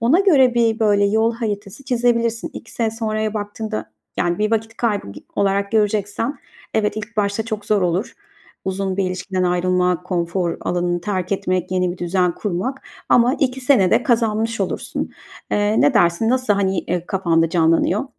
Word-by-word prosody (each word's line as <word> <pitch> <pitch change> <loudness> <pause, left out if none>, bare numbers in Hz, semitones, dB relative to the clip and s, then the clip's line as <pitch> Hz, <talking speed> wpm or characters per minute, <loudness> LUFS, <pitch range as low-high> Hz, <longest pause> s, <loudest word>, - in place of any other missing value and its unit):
ona 265 +11 +4
göre 270 -11 +5
bir, 230 -1 +2
böyle, 205 -2 +3
yol 220 +3 +2
haritası 215 +1 -5
çizebilirsin. 235 -2 0
2 230 - -10
sene 225 -2 0
sonraya 215 -1 -2
baktığında, 210 - -4 0.3
yani, 175 -1 0
bir 210 0 +1
vakit 225 0 -1
kaybı 210 - -1 0.3
olarak 200 +1 +1
göreceksen 215 +4 0 0.4
Evet 215 -1 +1
ilk 215 +2 -6
başta 205 +1 0
çok 215 -3 -4
zor 210 -2 +2
olur. 180 +6 -1 0.5
Uzun 190 0 -2
bir 195 - +1
ilişkiden 185 0 -2
ayrılma, 180 0 +1
konfor 175 -1 -1
alanını 175 0 -1
terk 185 0 -2
etmek, 185 -2 -1
yeni 180 -1 +1
bir 185 - -11
düzen 180 0 +1
kurmak 210 +7 -3 0.3
ama 245 +3 +4
2 265 -1 -1
sene 250 -9 +4
de - - +4
kazanmış 225 -2 +1
olursun. 190 - -3 0.4
Eee, 210 +1 +2
ne 275 - +4
dersin? 175 +4 +3
Nasıl, 255 -4 +2
hani, 195 -2 0
eee, 175 0 -2
kafanda 165 -4 +1
canlanıyor? 165 +6 +2
205 Hz, 160 wpm, -20 LUFS, 185-225 Hz, 0.5 s, göre